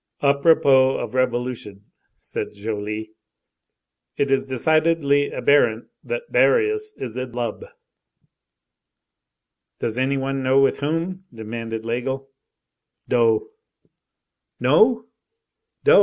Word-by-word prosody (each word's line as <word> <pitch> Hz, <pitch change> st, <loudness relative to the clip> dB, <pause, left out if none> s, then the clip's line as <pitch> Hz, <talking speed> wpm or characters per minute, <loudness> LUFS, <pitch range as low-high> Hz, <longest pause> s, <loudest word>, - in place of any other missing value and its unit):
"À 140 Hz, 0 st, +5 dB
propos 135 Hz, -4 st, +4 dB
of -, -, -5 dB
revolution," 120 Hz, -5 st, -2 dB, 0.3 s
said -, -, -6 dB
Joly, 105 Hz, +1 st, -5 dB, 1.1 s
"it 140 Hz, -1 st, 0 dB
is 135 Hz, -, +2 dB
decidedly 145 Hz, +1 st, +2 dB
abberent 120 Hz, -6 st, +2 dB
that -, -, -4 dB
Barius 430 Hz, -2 st, +2 dB
is 115 Hz, -, -6 dB
in 130 Hz, -1 st, -5 dB
lub." 120 Hz, -3 st, -4 dB, 2.1 s
"Does 115 Hz, +2 st, -3 dB
any 135 Hz, +2 st, +1 dB
one 135 Hz, 0 st, -2 dB
know 130 Hz, +1 st, +3 dB
with 135 Hz, -, +2 dB
whom?" 165 Hz, +6 st, -3 dB
demanded 115 Hz, 0 st, -6 dB
Laigle. 130 Hz, +4 st, -3 dB, 0.8 s
"Do." 430 Hz, -2 st, +2 dB, 1.1 s
"No?" 230 Hz, 0 st, +4 dB, 0.8 s
"Do! 465 Hz, +3 st, +7 dB
135 Hz, 95 wpm, -22 LUFS, 120-165 Hz, 2.1 s, Do